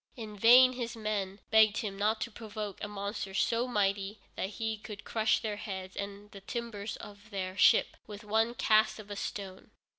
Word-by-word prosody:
In 220 -3 -7
vain 250 +5 +7
his 240 -2 -4
men 210 -3 -3
begged 220 -1 +6
him 210 -5 -3
not 215 +2 +1
to 235 - -3
provoke 210 -2 -6
a - - -2
monster 200 -1 -5
so 235 +4 +1
mighty 200 -2 0 0.2
that 190 - -2
he 220 +1 -3
could 210 -1 -9
crush 220 -1 +1
their 210 -2 -3
heads 190 -3 -6
and 200 +1 -6
the 195 - -11
timbers 215 -1 -5
of 205 +1 -12
their 190 -3 -4
ship 190 - +5
with 210 -1 -9
one 220 +3 +1
cast 215 -4 +3
of 210 -1 -10
a - - -4
stone. 195 -1 -6
210 Hz, 185 wpm, -31 LUFS, 200-220 Hz, 0.2 s, vain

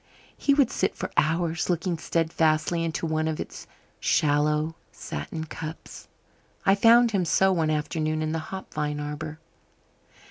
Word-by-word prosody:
He 280 - +2
would 275 -4 +3
sit - - 0
for - - -5
hours 165 +2 +1
looking 175 -1 0
steadfastly 165 0 +1
into 165 0 -2
one 155 0 0
of 160 -1 -2
its - - -7 0.3
shallow 150 +1 +2 0.2
satin 160 -1 -6
cups. 160 0 -8 0.6
I 195 - +6
found 230 +3 +6
him 195 -4 +1
so 190 +3 +3
one 165 -4 +1
afternoon 155 +1 -1
in 155 - -1
the 165 - -1
hop 190 0 -7
vine 150 -1 -2
arbour. 150 +1 -5
160 Hz, 145 wpm, -26 LUFS, 155-175 Hz, 0.6 s, I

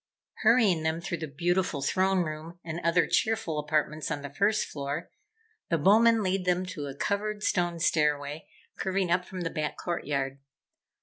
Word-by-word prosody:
Hurrying 210 -9 +4
them 160 +1 0
through 170 0 -4
the 160 - -4
beautiful 170 0 0
throne 190 +3 +2
room 155 +2 -6
and 165 0 -4
other 170 0 +3
cheerful 220 -5 0
apartments 155 0 -1
on 145 -2 -3
the 140 - -6
first 200 +6 +2
floor, 145 +3 -5 0.6
the 165 - +2
Bowmen 220 +7 +5
lead 190 0 0
them 180 0 +1
to 170 -6 -5
a 135 - -7
covered 210 +5 -2
stone 175 -2 0
stairway 150 -2 0 0.3
curving 190 -2 -1
up 180 +1 +2
from 185 -1 -7
the 165 - -2
back 155 -1 -3
courtyard. 140 -5 -2
170 Hz, 165 wpm, -28 LUFS, 150-190 Hz, 0.6 s, Bowmen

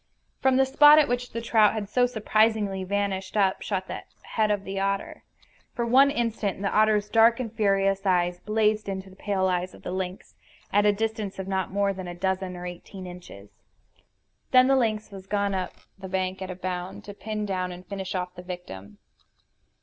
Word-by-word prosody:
From 265 -1 +3
the 265 - +5
spot 295 +3 +7
at 305 - +5
which 245 +1 -2
the 230 - -4
trout 220 -3 +4
had 215 -2 -3
so 245 +4 +2
surprisingly 215 -4 +1
vanished 195 0 -2
up 195 -2 +2
shot 190 -2 -2
the - - -5 0.2
head 215 -1 0
of 205 -2 0
the 195 0 -4
otter. 195 0 -2 0.5
For 235 - -1
one 265 +4 +6
instant 225 -6 -2
the 200 - -1
otter's 215 -1 +3
dark 225 +2 +5
and 235 -3 -4
furious 195 -3 +1
eyes 180 -2 +1
blazed 215 -1 +1
into 190 0 -5
the - - -16
pale 195 -1 -1
eyes 180 0 -1
of - - -17
the - - -4
lynx, 185 0 -5 0.4
at 205 +1 +4
a - - +6
distance 215 -1 -3
of 190 0 -5
not 190 -2 -1
more 200 0 +1
than 185 -1 -7
a 175 - -6
dozen 190 0 -2
or 175 - -7
eighteen 180 +2 -8
inches. 175 - -12 0.9
Then 255 0 +6
the 270 +1 +4
lynx 220 -4 0
was 195 -1 -10
gone 200 0 0
up 185 -1 -2 0.3
the 190 -1 -8
bank 185 0 -2
at 190 - -5
a 185 - -5
bound, 180 0 -5
to 205 - -9
pin 210 +1 -4
down 185 -2 -2
and 180 +1 -10
finish 190 -1 -5
off 180 0 -3
the 180 - -9
victim. 105 - -9
195 Hz, 200 wpm, -26 LUFS, 185-215 Hz, 0.9 s, spot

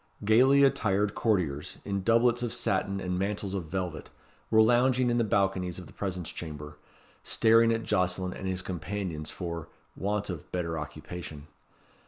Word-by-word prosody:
Gaily 130 +6 +6
attired 105 -6 +2
courtiers, 85 -10 0
in 100 -1 -1
doublets 115 +3 +3
of 120 -2 -2
satin 100 0 0
and 90 -1 -2
mantles 100 0 -2
of 95 -4 -3
velvet, 90 -1 -4 0.4
were 110 0 +6
lounging 125 +2 +3
in 120 - +2
the - - +3
balconies 95 -4 0
of 90 - -8
the - - -15
presence 90 -4 -4
chamber, 75 -2 -8 0.4
staring 115 +1 +4
at 115 0 0
Jocelyn 90 -2 0
and 95 - -6
his 95 0 -1
companions 90 -2 -4
for, 85 -3 -5 0.3
want 100 0 -1
of 80 -5 -8
better 85 -2 -2
occupation. 75 -1 -7
95 Hz, 155 wpm, -29 LUFS, 90-110 Hz, 0.4 s, Gaily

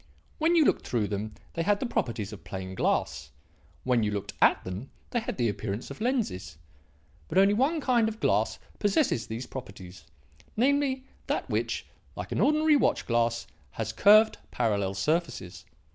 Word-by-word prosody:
When 325 +2 +3
you 320 -3 +5
looked - - +1
through 110 -4 0
them 105 +1 -4 0.2
they 165 - -2
had 205 +4 +2
the - - -2
properties 115 - -2
of 105 - -11
plain 95 -1 -6
glass; 65 -7 -1 0.5
when 125 -2 +2
you 105 - +1
looked 105 -1 -4
at - - +5
them 95 +9 -6 0.2
they 240 - +1
had 235 - -5
the 120 -2 +2
appearance 105 +3 -4
of 140 - -9
lenses. 205 - -1 0.7
But - - -2
only 195 +1 +6
one 275 +9 +2
kind 240 -5 +3
of 220 0 -9
glass - - +1 0.2
possesses 205 - +1
these 115 +3 -5
properties; 95 -8 -10 0.5
namely, 270 +1 +2 0.2
that - - -1
which, - - -1 0.3
like - - -6
an - - 0
ordinary 305 0 +4
watch - - +1
glass, 115 0 +1 0.3
has 110 0 -3
curved, 215 - +6
parallel 100 -5 0
surfaces. 125 - -2
125 Hz, 165 wpm, -28 LUFS, -, 0.7 s, only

